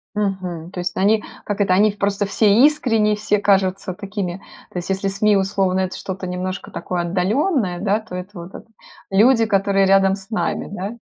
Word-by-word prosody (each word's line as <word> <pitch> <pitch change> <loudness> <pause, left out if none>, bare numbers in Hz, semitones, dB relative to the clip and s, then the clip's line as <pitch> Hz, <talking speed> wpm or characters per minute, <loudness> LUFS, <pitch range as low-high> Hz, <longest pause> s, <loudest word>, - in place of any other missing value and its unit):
Мгм. 185 -5 -3
То 185 - -9
есть 180 0 -3
они, 210 +3 +2 0.2
как 205 0 -4
это, 185 -2 +3
они 210 +2 +4
в 205 - -12
просто 200 0 0
все 205 +1 +2 0.2
искренние, 225 -8 +3
все 210 -1 0
кажутся 190 -2 +1
такими 195 -2 -5 0.3
То 180 - -5
есть 175 - -5
если 195 +1 -1
СМИ, 205 +1 +2
условно, 190 -1 +1
это 185 0 -2
что-то 190 -1 -6
немножко 185 +1 -4
такое 175 +1 -4
отдалённое, 190 - 0
да, 205 +1 +1
то 215 -4 -11
это 180 +2 -6
вот 170 +3 -10
это - - -10 0.4
люди, 225 +4 +5
которые 195 -2 +2
рядом 195 0 +4
с 195 +2 -11
нами, 215 - -2
да? 205 +3 -5
195 Hz, 190 wpm, -20 LUFS, 185-210 Hz, 0.4 s, люди